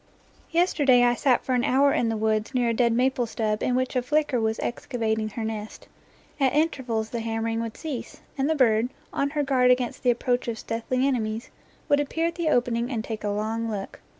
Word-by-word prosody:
Yesterday 290 -7 +4
I 240 0 +4
sat 250 0 +2
for 260 - 0
an 245 -1 +2
hour 275 +2 +3
in 230 - +1
the 225 - -1
woods 220 +3 0
near 245 -2 +2
a - - +1
dead 235 0 +2
maple 250 0 +1
stub 215 -1 -1
in 250 - +1
which 255 0 -1
a 250 - +2
flicker 290 -2 +1
was 220 0 0
excavating 220 -3 -2
her 225 +2 -5
nest. 220 -1 -6 0.5
At 270 -1 +2
intervals 250 -8 0
the 235 - -2
hammering 225 0 -2
would 230 -1 -5
cease, 295 -7 -6
and 275 +1 0
the 320 - +2
bird, 235 -3 +3 0.2
on 280 - 0
her 295 0 -1
guard 260 -2 +3
against 250 -1 +1
the 250 - +2
approach 245 +1 0
of 230 -1 -2
stealthy 230 +4 -2
enemies, 225 -3 -2 0.4
would 285 - +3
appear 320 +3 -1
at 335 - 0
the 340 -3 -1
opening 240 -3 +1
and 230 -5 -2
take 220 -2 -6
a 205 - -1
long 220 +2 -2
look. 200 -3 -5
245 Hz, 210 wpm, -25 LUFS, 225-265 Hz, 0.5 s, Yesterday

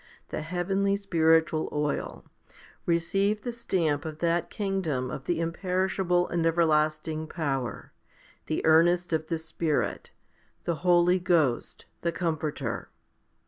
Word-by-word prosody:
the - - -3
heavenly 195 +4 0
spiritual 165 -5 +2
oil, 150 0 -2 0.6
receive 195 +5 +1
the 245 - -2
stamp 165 -10 0
of 155 -2 -6
that 170 +1 0
kingdom 185 - -2
of. 135 - -6
the 170 -2 0
imperishable 180 +1 0
and 170 -1 0
everlasting 155 -1 +1
power, 135 -7 -3 0.6
the 155 - -1
earnest 175 +2 +4
of 155 0 0
the 165 - -1
Spirit* 160 -1 -2 0.5
the 170 -2 -1
Holy 180 0 +4
Ghost 165 -9 +1 0.2
the 170 - 0
Comforter. 155 -8 -3
165 Hz, 115 wpm, -28 LUFS, 155-180 Hz, 0.6 s, earnest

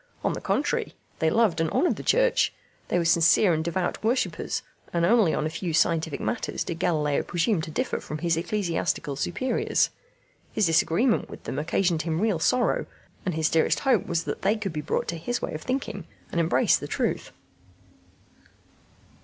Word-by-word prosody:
On - - +1
the - - -5
contrary, - - -1 0.2
they 160 - +3
loved 190 -4 +2
and 165 - +1
honoured 350 - +2
the - - -7
Church. - - +3 0.4
They - - +1
were 170 - +1
sincere 165 +3 +5
and 160 0 0
devout 175 +4 -2
worshippers, 235 +4 -1 0.3
and 170 -1 +1
only 215 -3 +4
on 155 - -1
a - - 0
few 165 0 -3
scientific 160 -2 +1
matters 240 - -2
did 165 -2 -5
Galileo 155 -5 +1
presume 175 +1 0
to 155 - -6
differ 155 - -2
from 150 - -6
his 170 +1 +1
ecclesiastical 170 -5 -1
superiors: 175 - 0 0.6
his 215 - +1
disagreement 170 +8 +2
with - - -10
them 135 - -3
occasioned 165 +1 +1
him 160 0 -2
real 210 -5 +1
sorrow; 245 +8 +1 0.4
and 180 - 0
his 160 -1 +2
dearest 160 - +2
hope 255 -8 +2
was 170 -1 0
that - - -4
they 200 +3 +2
could 200 -5 -4
be 150 - -3
brought - - -2
to 170 - -3
his 245 +9 -2
way - - -4
of 155 - -5
thinking 220 - -3 0.2
and 170 - 0
embrace 130 -6 +3
the - - -7
truth. - - -2
170 Hz, 180 wpm, -26 LUFS, 160-210 Hz, 0.6 s, sincere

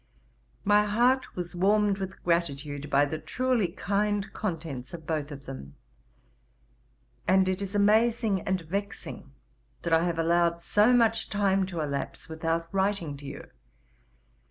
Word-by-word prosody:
'My 210 0 +5
heart 245 +5 +2
was 175 0 -5
warmed 205 +2 +3
with 190 -1 -6
gratitude 150 -4 -1
by 140 +1 +4
the 155 +2 -4
truely 245 +5 0
kind 205 +2 -1
contents 165 - -4
of 160 -2 -11
both 155 -3 -2
of 140 -1 -9
them; 70 - -8 1.5
and 190 0 +4
it 185 +1 -1
is 200 +1 -4
amazing 215 0 +3
and 190 -1 -1
vexing 200 +5 -5 0.5
that 170 - 0
I 165 +1 +4
have 170 -2 -1
allowed 170 +1 +2
so 210 +6 +4
much 225 -2 +3
time 195 -2 +2
to 175 -4 -4
elapse 140 -2 -4
without 165 +1 -2
writing 190 -6 0
to 140 0 -10
you. 140 - -9
185 Hz, 140 wpm, -28 LUFS, 160-205 Hz, 1.5 s, My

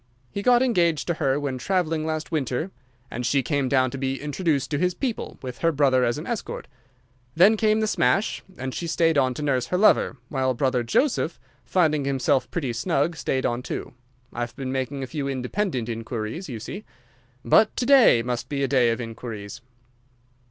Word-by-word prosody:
He 200 - -3
got 245 +3 +4
engaged 170 - +2
to 170 - 0
her 140 -4 0
when 135 -3 -3
traveling 165 -1 0
last 155 0 -3
winter, 155 +3 -1 0.4
and 125 - -4
she 135 +2 +2
came 140 0 0
down 130 -1 +2
to 135 - -6
be 135 0 -2
introduced 150 -2 -1
to 145 - 0
his 180 +1 +1
people, 250 -5 -3
with 125 -1 -6
her 165 - +2
brother 135 -4 +3
as 120 +2 +1
escort. 210 +9 -5 0.7
Then 190 +7 +6
came 215 0 +2
the - - +2
smash, 210 -1 +1 0.2
and 130 0 -4
she 170 - -4
stayed 165 0 +2
on 130 -3 +2
to 150 - -4
nurse 130 -4 0
her 180 - 0
lover, 205 -7 +4
while 130 -2 0
brother 130 -1 +1
Joseph, 165 - 0 0.3
finding 155 -3 +2
himself 135 -2 +1
pretty 135 -8 -2
snug, 160 +5 0
stayed 130 -3 -1
on 120 +1 0
too. - - -5 0.4
I've 120 0 -4
been 135 -2 -4
making 135 +1 -3
a - - -2
few 140 +1 -4
independent 130 - -2
inquiries, 115 - -5
you 120 -4 -5
see. 195 - -7 0.6
But 215 - +4
to 250 - 0
day 250 - +6
must 120 0 -3
be 140 -1 -1
a - - +2
day 125 -4 +3
of 115 - -1
inquiries." 115 -3 -7
140 Hz, 185 wpm, -24 LUFS, 125-170 Hz, 0.7 s, Then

